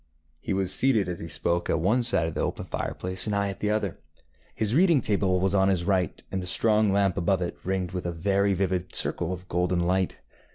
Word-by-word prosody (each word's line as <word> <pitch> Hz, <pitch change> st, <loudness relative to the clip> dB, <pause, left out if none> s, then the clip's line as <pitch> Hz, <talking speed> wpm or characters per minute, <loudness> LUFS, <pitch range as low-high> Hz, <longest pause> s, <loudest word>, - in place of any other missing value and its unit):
ŌĆØ -, -, -39 dB, 0.3 s
He 100 Hz, -, -3 dB
was 95 Hz, -1 st, 0 dB
seated 115 Hz, -8 st, +2 dB
as 90 Hz, -1 st, -4 dB
he 85 Hz, -, -6 dB
spoke 85 Hz, +2 st, 0 dB
at 80 Hz, -, +1 dB
one 105 Hz, +9 st, +2 dB
side 105 Hz, -8 st, +1 dB
of 80 Hz, -, -3 dB
the -, -, -2 dB
open -, -, -3 dB
fireplace, 95 Hz, +1 st, -3 dB
and 105 Hz, -, 0 dB
I 100 Hz, 0 st, 0 dB
at 100 Hz, -, -6 dB
the 105 Hz, -, -1 dB
other. 105 Hz, -3 st, -1 dB, 0.6 s
His 110 Hz, 0 st, 0 dB
reading 170 Hz, 0 st, +5 dB
table 100 Hz, -5 st, +1 dB
was 95 Hz, +1 st, +1 dB
on 95 Hz, -1 st, +3 dB
his 90 Hz, -3 st, 0 dB
right, 95 Hz, -3 st, 0 dB
and 95 Hz, -, -2 dB
the 90 Hz, -, -5 dB
strong 110 Hz, 0 st, +2 dB
lamp 100 Hz, -2 st, +2 dB
above 90 Hz, +1 st, +1 dB
it 85 Hz, -, -4 dB
ringed 95 Hz, -1 st, -1 dB
it -, -, -13 dB
with 90 Hz, -1 st, -3 dB
a -, -, -1 dB
very 100 Hz, +3 st, +1 dB
vivid 90 Hz, -1 st, -2 dB
circle 85 Hz, 0 st, +1 dB
of 90 Hz, 0 st, -6 dB
golden 90 Hz, 0 st, 0 dB
light. 90 Hz, +1 st, 0 dB
95 Hz, 240 wpm, -26 LUFS, 90-100 Hz, 0.6 s, reading